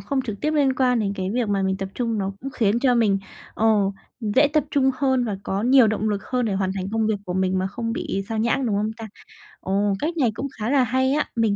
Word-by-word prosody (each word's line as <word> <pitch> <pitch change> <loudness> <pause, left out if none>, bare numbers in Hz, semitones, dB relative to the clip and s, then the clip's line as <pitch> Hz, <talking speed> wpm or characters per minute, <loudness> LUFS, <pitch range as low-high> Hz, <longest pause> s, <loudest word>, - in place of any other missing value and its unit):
không 275 -1 -1
trực 215 -5 -6
tiếp 305 - 0
liên 285 -4 +2
quan 250 -2 +2
đến 200 -2 -1
cái 190 0 -3
việc 235 -1 -1
mà 200 -1 +1
mình 190 0 0
tập 195 -1 -4
trung, 230 -3 -1
nó 195 0 -2
cũng 270 - -5
khiến 225 -3 +1
cho 255 -3 +3
mình, 210 -4 +3 0.4
ờ, 225 - +1 0.5
dễ 245 +7 +3
tập 305 -1 +2
trung 265 -2 +3
hơn 260 -2 +1
và 205 -4 -2
có 195 +2 -2
nhiều 255 -1 +6
động 215 0 0
lực 200 -2 -2
hơn 250 -1 -1
để 210 - -1
hoàn 190 -1 0
thành 190 0 -4
công 220 -1 +1
việc 220 - +1
của 180 - -3
mình 190 0 +1
mà 190 - 0
không 230 +3 -4
bị 195 -4 -3
xao 225 -1 -2
nhãng, 235 +3 +1
đúng 205 -3 0
không 215 +1 0
ta? 225 -1 -8 0.5
Ồ, 200 +1 0
cách 335 +3 -2
này 245 -7 +2
cũng 280 - -3
khá 215 +3 -2
là 270 -2 +4
hay 260 +2 +1
á, 300 - +1
mình 225 -3 +2
225 Hz, 270 wpm, -23 LUFS, 200-260 Hz, 0.5 s, nhiều